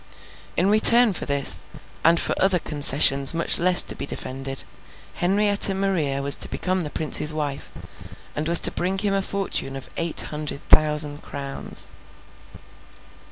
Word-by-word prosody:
In 180 - 0
return 220 +2 +6
for - - -7
this, 140 -1 0 0.4
and 165 +1 +3
for - - -2
other 190 -1 +2
concessions 140 -2 +3
much 165 - -1
less 180 +1 +4
to - - -2
be - - -7
defended, 135 0 -6 0.5
Henrietta 200 +1 +3
Maria 165 -9 -3
was 140 0 +3
to - - -3
become 185 0 -4
the 150 - -4
Prince's 150 0 0
wife, 145 -3 -6 0.7
and 150 +1 -5
was 170 0 +7
to - - +2
bring 185 +2 -4
him 200 0 -2
a 195 - -1
fortune 195 -8 -5
of 135 - -10
eight 165 -1 -1
hundred 150 -2 -8
thousand 150 -1 +1
crowns. 140 -1 -2
160 Hz, 150 wpm, -21 LUFS, 140-190 Hz, 0.7 s, was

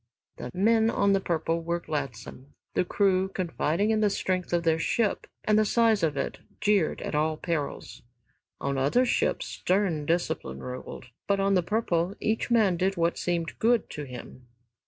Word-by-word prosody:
Men 220 +4 +3
on 200 -3 +2
"The 195 - +3
Purple" 165 -2 -1
were 170 +1 -1
gladsome. 140 -3 -6 0.2
The - - +2
crew, 190 0 +2
confiding 185 +1 -1
in 220 -1 +2
the 210 - +4
strength 185 -2 -2
of 175 -1 +1
their 165 -1 +2
ship 215 +5 0 0.2
and 215 0 +3
the - - +5
size 225 -1 +3
of 150 -3 0
it, 135 - -3 0.2
jeered 205 -6 +1
at - - -4
all 155 +1 +1
perils. 145 -6 -4 0.6
On 140 -1 -1
other 145 - +3
ships 240 - 0
stern 180 -6 0
discipline 165 - -1
ruled, 125 0 -7 0.2
but 200 -1 +2
on 195 0 +2
"The 185 - +4
Purple" 180 -2 0
each 220 +2 -1
man 215 -7 +3
did 190 +2 0
what 170 0 +1
seemed 170 -2 -2
good 230 -1 +2
to 150 - -5
him. 125 -1 -10
175 Hz, 170 wpm, -27 LUFS, 155-205 Hz, 0.6 s, the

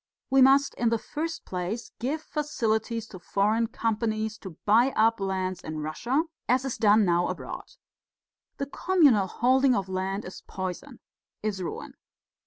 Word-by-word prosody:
We 270 0 +5
must, 275 +2 +5
in 235 - +3
the 230 - +2
first 320 +8 -5
place, 185 +6 -4
give 295 +6 -2
facilities 230 -7 -1
to 185 - -10
foreign 210 +6 +1
companies 220 -1 -2
to 185 -5 -10
buy 235 +6 +4
up 225 +1 +3
lands 185 -2 -2
in 155 0 -6
Russia 235 - 0 0.3
as 255 +2 +3
is 265 - -3
done 210 0 +5
now 175 0 +2
abroad. - - -6 0.8
The 275 - -2
communal 280 - +3
holding 260 +5 +3
of 195 -1 -2
land 190 +2 -2
is 185 - -9
poison, 185 -2 -6 0.4
is 205 -3 -2
ruin.' 175 - -5
220 Hz, 150 wpm, -27 LUFS, 190-260 Hz, 0.8 s, We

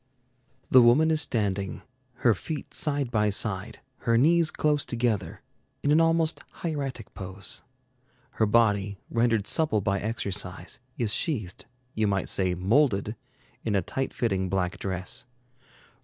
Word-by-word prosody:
The 130 - +9
woman 135 +7 +5
is 155 -1 +3
standing, 100 -8 -2 0.4
her 115 - +7
feet 150 - -6
side 140 -4 0
by 105 -2 +2
side, 105 +1 -1 0.2
her 115 -1 +1
knees 165 +5 +4
close 150 -2 +1
together, 115 -5 -2 0.4
in 145 - +2
an 155 +2 +5
almost 165 -1 +1 0.2
hieratic 140 - -4
pose. 95 +1 -6 0.8
Her 110 - +4
body, 105 -3 +2
rendered 115 -3 +2
supple 155 -7 +2
by 100 0 0
exercise, 95 -5 -3 0.2
is 110 -3 0
sheathed 110 - -2 0.3
you 110 -1 +1
might 95 -2 0
say 95 -2 +1
molded 105 - +2 0.5
in 110 -3 0
a 95 - +2
tight 135 +9 -3
fitting 95 -5 -1
black 90 -2 -1
dress. 95 +5 -3
110 Hz, 135 wpm, -27 LUFS, 95-135 Hz, 0.8 s, The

